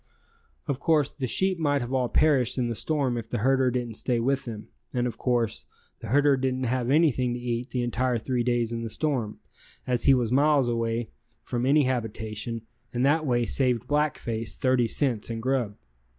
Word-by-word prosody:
Of 140 -2 -1
course, 150 -2 +2
the 130 -3 -3
sheep 190 +7 0
might 145 -3 +1
have 120 +2 -4
all 125 -2 +1
perished 140 -6 +2
in 120 -2 0
the - - -1
storm 130 +1 0
if 115 -1 -9
the - - -2
herder 130 +3 +3
didn't 120 -2 -3
stay 120 -2 0
with 135 +3 0
them, 110 -3 -7 0.3
and 120 0 +1
of 120 -3 -4
course, 120 -3 -1 0.3
the 115 - -8
herder 140 +4 +4
didn't 130 0 -1
have 125 0 -1
anything 130 -5 +3
to - - -5
eat 120 0 -3
the 125 -1 -1
entire 120 +1 0
three 125 +2 -1
days 120 -1 0
in 115 - -3
the 115 - -4
storm, 125 -5 -2 0.5
as 125 -1 0
he 135 - +7
was 120 -3 0
miles 140 -2 +3 0.7
from 125 +1 -2
any 145 +2 +5
habitation 115 -2 -3 0.3
and 125 +2 0
that 155 +2 +2
way 120 -2 +2
saved 125 -2 0
Black 150 +2 +1
Face 115 -1 -4
30 130 -2 +2
cents 120 -3 -1
in 115 -1 -3
grub. 120 -4 -1
125 Hz, 195 wpm, -26 LUFS, 115-135 Hz, 0.7 s, he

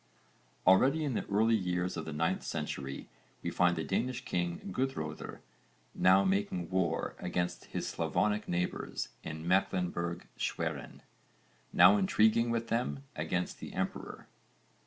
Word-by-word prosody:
Already 130 +12 +5
in 140 -4 -1
the - - -2
early 110 +3 +3
years 90 -2 -1
of 80 - -4
the 80 - -5
9th 80 +2 0
century 70 0 -4 0.4
we - - -1
find 90 -1 +3
the 80 - -2
Danish 120 +8 -1
king 85 -1 -1
Guðröðr 125 - -3 0.5
now 95 +1 +5
making 95 -2 0
war 85 -3 0
against 90 0 -2
his - - -4
Slavonic 105 0 0
neighbours 90 +1 -2
in 80 +1 -6
Mecklenburg 90 -2 0
Schwerin, - - -3 0.7
now 90 +4 +7
intriguing 110 +4 +3
with 115 0 -1
them 70 - -1
against 90 0 -2
the - - -8
emperor. - - -4
90 Hz, 130 wpm, -32 LUFS, 85-105 Hz, 0.7 s, now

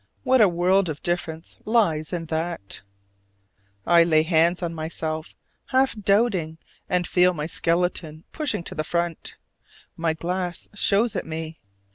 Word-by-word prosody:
What 260 -2 +4
a 205 - +6
world 180 +2 +2
of 150 -2 -6
difference 165 -2 -3
lies 185 -9 +1
in 170 -2 -3
that! 160 - -4 1.0
I 170 -1 +6
lay 155 -2 +4
hands 170 +2 +2
on 170 -1 -2
myself, 160 0 -4 0.3
half 265 0 +2
doubting, 200 -6 +1 0.3
and 180 -2 +1
feel 180 +1 +3
my 150 -1 -3
skeleton 165 -1 -1
pushing 300 - -2
to - - -6
the 155 - -2
front: 170 +1 -2 0.6
my 165 -1 0
glass 175 +1 -3
shows 205 +2 +2
it - - -3
me. 160 0 -6
170 Hz, 140 wpm, -24 LUFS, 160-185 Hz, 1.0 s, a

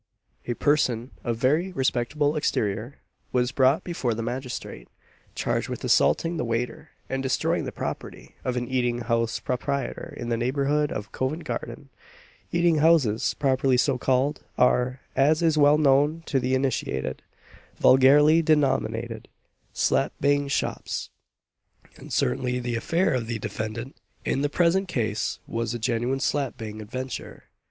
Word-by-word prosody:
A 120 - -1
person 130 -4 +1
of 120 -2 -1
very 150 +10 +1
respectable 145 0 0
exterior 110 -3 -1 0.4
was 125 0 +1
brought 130 +3 +3
before 130 -10 -2
the 115 - -3
magistrate, 125 - -5 0.5
charged - - -1
with - - -5
assaulting 165 0 +2
the - - -1
waiter, 115 0 -3 0.2
and 135 0 -2
destroying 130 -1 0
the - - -4
property, - - -6
of 125 -1 -1
an 120 0 -2
eating 120 -2 0
house 115 -1 0
proprietor 130 +1 -3
in 120 - -5
the 115 - +1
neighbourhood 140 +4 0
of 105 - -5
Covent 145 +6 -2
garden. - - -6 0.6
Eating 170 -2 +3
houses, 150 -9 +3
properly 135 -2 +2
so 130 0 +2
called, 135 +4 +1
are, 125 +1 +2
as 155 +4 +3
is 160 -2 +3
well 145 0 +5
known 150 +2 +3
to 135 - +1
the 130 +1 0
initiated, 120 - -2 0.6
vulgarly 145 +5 +6
denominated 145 - 0 0.4
"slap - - +1
bang 145 0 +2
shops;" 140 - -2 0.9
and - - -12
certainly 125 - 0
the 120 -1 -2
affair 165 +9 +1
of 120 -3 -1
the 115 -1 -2
defendant, 110 +4 -5 0.3
in 135 - 0
the 145 - +1
present 175 +5 +2
case, 110 -9 -1
was 115 0 -3
a - - -1
genuine 120 +3 -1
slap 140 -2 -1
bang 110 -1 -7
adventure. 130 +4 -6
130 Hz, 145 wpm, -25 LUFS, 120-145 Hz, 0.9 s, vulgarly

